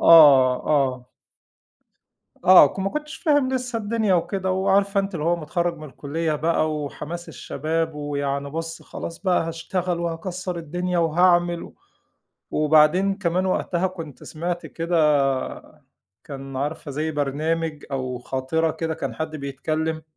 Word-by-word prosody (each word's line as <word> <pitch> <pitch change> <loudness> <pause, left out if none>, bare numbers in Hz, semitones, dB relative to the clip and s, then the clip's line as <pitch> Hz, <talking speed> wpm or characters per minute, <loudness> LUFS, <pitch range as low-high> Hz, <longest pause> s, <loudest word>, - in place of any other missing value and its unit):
آه، 140 -6 +8
آه. 130 -4 +1 1.4
آه، 185 -4 +9
ك - - -10
ما 195 - 0
كنتش 300 +2 -5
فاهم 290 -5 +2
لسه 250 -2 -2
الدنيا 215 -2 +1
وكده، 190 +2 -1
وعارفة 195 +1 +2
أنتِ 195 -1 -4
اللي 155 - -3
هو 170 +1 +2
متخرّج 170 +2 -2
من 155 - -9
الكلّية 155 +3 -2
بقى 155 +1 +1
وحماس 155 +4 -6
الشباب، 160 +2 -3
ويعني 140 -1 -3
بُصّ 165 +2 -5
خلاص 165 - -7
بقى 180 -4 +1
هاشتغل، 170 +1 -2
وهاكسّر 175 +2 -4
الدنيا، 175 +2 -2
وهاعمل. 175 +1 +3
و - - -11 0.8
وبعدين 155 +6 +4
كمان 185 -1 0
وقتها 185 -1 0
كنت 165 -7 -8
سمعْت 175 +2 -4
كده 170 +1 -2 1.3
كان 135 -2 -8
عارفة 145 +2 -3
زي 155 +3 -2
برنامج 155 +2 -2
أو 130 -2 -3
خاطرة 135 +6 -1
كده 160 0 -3
كان - - -4
حد 160 0 -4
بيتكلّم، 155 +3 -3
165 Hz, 135 wpm, -23 LUFS, 150-180 Hz, 1.4 s, آه